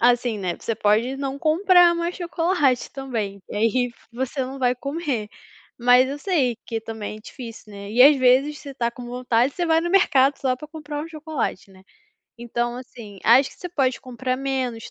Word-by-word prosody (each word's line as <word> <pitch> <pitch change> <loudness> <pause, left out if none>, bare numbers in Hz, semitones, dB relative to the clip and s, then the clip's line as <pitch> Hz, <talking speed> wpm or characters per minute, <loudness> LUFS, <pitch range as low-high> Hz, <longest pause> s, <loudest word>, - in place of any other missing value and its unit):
assim, 240 -2 +2
né, 180 -3 -3
você 230 - -3
pode 225 +6 +1
não 275 0 -4
comprar 350 +3 +5
mais 340 +1 -2
chocolate 335 -7 0
também, 220 -8 -4
e - - -5
aí 235 +3 +1 0.2
você 265 +3 -3
não 265 +2 -7
vai 250 -1 +2
comer. 275 -5 -3 0.5
Mas 250 +2 +5
eu 280 +2 -5
sei 285 - 0
que 225 -1 -3
também 220 -1 -6
é - - -15
difícil, 230 -2 -10
né, 200 0 -8
e 245 +3 +5
às 290 +1 +8
vezes 265 +4 +3
você 285 - -9
está 235 -3 -2
com 245 +1 -10
vontade, 245 +1 0
você 350 -1 -1
vai 325 0 +3
no 345 +1 -2
mercado 280 -8 +4
só 255 -2 0
para 300 +3 -11
comprar 300 -2 -6
um 325 - -7
chocolate, 310 - -4
né. 190 -1 -18 0.6
Então, 240 0 -2
assim, 230 -5 -11
acho 255 +4 +5
que - - -19
você 360 - -6
pode 270 -7 0
comprar 255 0 -3
menos, 260 -4 -3
255 Hz, 195 wpm, -23 LUFS, 235-295 Hz, 0.6 s, às